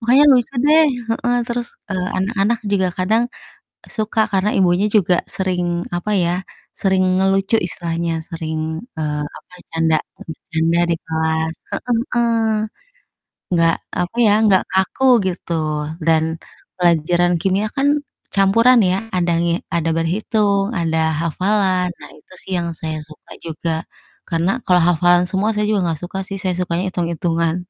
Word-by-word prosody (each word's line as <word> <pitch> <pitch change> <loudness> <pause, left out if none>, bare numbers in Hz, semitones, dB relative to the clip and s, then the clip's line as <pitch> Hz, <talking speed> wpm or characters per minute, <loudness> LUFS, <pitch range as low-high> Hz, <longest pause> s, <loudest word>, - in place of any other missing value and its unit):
makanya 255 +5 +5
lucu 250 0 +2
deh, 310 +2 +6 0.2
heeh. 240 +2 0
Terus, 235 0 -2 0.2
eee, 185 -1 -1
anak-anak 210 +3 0
juga 190 -2 +2
kadang 215 +6 +2 0.7
suka 220 0 0
karena 195 +2 +2
ibunya 185 +1 +3
juga 185 -3 +3 0.2
sering, 185 -2 -1 0.3
apa 175 +4 -3
ya, 170 0 +1 0.5
sering 190 -1 +2 0.2
ngelucu 195 +3 +2
istilahnya, 170 -1 -3 0.2
sering, 160 -1 -3 0.2
eee, 150 -1 -2
apa, 180 - -15 0.2
canda 165 -1 +2 0.2
bercanda 165 +1 -2
di - - +3
kelas. 160 0 -1 0.2
Heeh 245 -2 -1 0.2
heeh. 235 -1 +2 1.2
Enggak, 165 -1 +3 0.3
apa 180 +5 -4
ya, 205 - +5
enggak 200 -4 +4
kaku, 190 +7 +1 0.2
gitu. 175 -1 -4 0.5
Dan 160 0 +3 0.5
pelajaran 175 0 +2
kimia 195 +3 +1
kan 275 +1 +2 0.5
campuran 230 +6 +5
ya, 185 - +1 0.2
ada 175 -1 +1
nge 170 0 +1 0.2
ada 165 -1 0
berhitung, 200 +4 0
ada 165 -1 0 0.2
hafalan, 185 +2 +1
nah, - - -10
itu 150 - -19
sih 190 - -11
yang 170 -1 -2
saya 155 -1 -3
suka 155 - -16
juga. 165 +1 -3 0.6
Karena 170 +3 +1
kalau 180 -1 +4
hafalan 175 +1 +4
semua 200 +3 0
saya 210 0 0
juga 210 -2 +2
gak 155 - -8
suka 185 +2 -5
sih, 195 - -5
saya 185 -1 0
sukanya 180 -1 -1
itung-itungan, 170 -2 -1
180 Hz, 140 wpm, -19 LUFS, 165-205 Hz, 1.2 s, deh